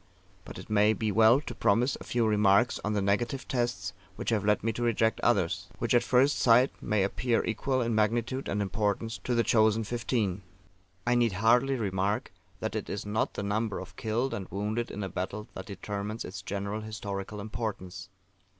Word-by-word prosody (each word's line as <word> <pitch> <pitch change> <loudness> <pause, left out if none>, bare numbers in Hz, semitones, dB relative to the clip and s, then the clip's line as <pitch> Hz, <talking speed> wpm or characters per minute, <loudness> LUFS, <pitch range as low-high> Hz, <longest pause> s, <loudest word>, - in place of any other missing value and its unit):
But - - -9
it - - -9
may 105 0 +4
be 110 -1 -1
well 110 +4 +6
to 135 - -7
premise 120 +4 +2
a - - -6
few 120 -1 0
remarks 105 +2 +3
on 105 - -1
the 100 -2 0
negative 120 +7 0
tests 120 -8 -1 0.2
which - - -3
have 105 -3 +1
led 105 -1 +2
me 115 0 0
to 120 - -5
reject 115 -1 +2
others, 95 -5 +1
which 120 - -1
at 120 - +5
first 130 +3 +3
sight 125 +2 +5
may 105 -2 +1
appear 115 +4 0
equal 130 +4 0
in 115 0 -1
magnitude 115 +5 0
and 105 0 0
importance 105 +2 -1
to 125 - -2
the 115 - +3
chosen 110 -1 +3
Fifteen. 110 -4 -1 0.6
I 120 - +3
need 120 -4 +2
hardly 120 +7 +3
remark 100 -2 -1 0.3
that - - -3
it - - -3
is - - -4
not 105 +2 -1
the 100 - -3
number 105 +1 -1
of 95 0 -8
killed 115 +6 -1
and 95 -2 -4
wounded 105 +5 -2
in 105 - -5
a - - -2
battle 95 +4 -4
that 95 - -8
determines 105 +2 -5
its 95 0 -7
general 100 +2 -3
historical 105 -1 -5
importance. 100 -4 -5
110 Hz, 190 wpm, -29 LUFS, 100-120 Hz, 0.6 s, well